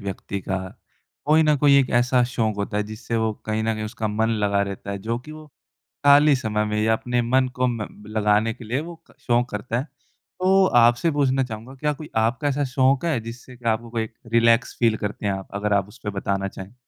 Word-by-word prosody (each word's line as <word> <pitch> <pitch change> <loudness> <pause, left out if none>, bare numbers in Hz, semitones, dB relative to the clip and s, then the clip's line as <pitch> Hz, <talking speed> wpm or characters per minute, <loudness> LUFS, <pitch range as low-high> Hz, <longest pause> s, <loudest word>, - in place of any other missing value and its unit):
व्यक्ति 100 0 -5
का 95 0 -2 0.7
कोई 155 +2 +4
न 155 -1 +3
कोई 140 0 +4
एक 130 - +1
ऐसा 125 +1 +3
शौक 115 -3 -1
होता 100 0 -3
है, 105 - +1
जिससे 110 +2 -5
वो 110 -1 +1
कहीं 110 0 -1
न 110 0 0
कहीं 110 0 -4
उसका 110 0 -3
मन 110 +2 0 0.2
लगा 100 0 +2
रहता 100 0 -7
है, 100 - -3
जो 115 +4 -3
कि 150 +5 -11
वो 155 0 -11 0.6
खाली 145 +1 +7
समय 105 -4 -1
में 105 0 -1
या 110 +1 +3
अपने 120 +2 -1
मन 130 +2 +2
को 125 0 +1
म 115 -4 -3 0.3
लगाने 105 +1 +2
के 120 - -13
लिए 120 +5 -1
वो 170 +2 -8
क - - -20
शौक 120 0 +2
करता 115 +3 -3
है, - - -2
तो 190 +4 -1 0.2
आपसे 120 +8 +3
पूछना 135 -2 +1
चाहूँगा, 120 +2 -8
क्या 150 +2 -1
कोई 150 +1 -10 0.2
आपका 125 +6 -1
ऐसा 145 0 0
शौक 135 +2 +3
है, 160 -7 +1
जिससे 120 +3 -10
कि 120 - -19
आपको 115 +1 -1
कोई 115 -1 -3 0.2
रिलैक्स 115 +1 +3
फ़ील 115 -2 +3
करते 105 0 -5
हैं 100 - +1
आप? 95 0 -6
अगर 105 +1 -1
आप 100 -1 +1
उस 115 +5 -16
पे 105 - -2
बताना 100 0 -1
चाहें। 95 +1 -10
115 Hz, 230 wpm, -23 LUFS, 105-130 Hz, 0.7 s, खाली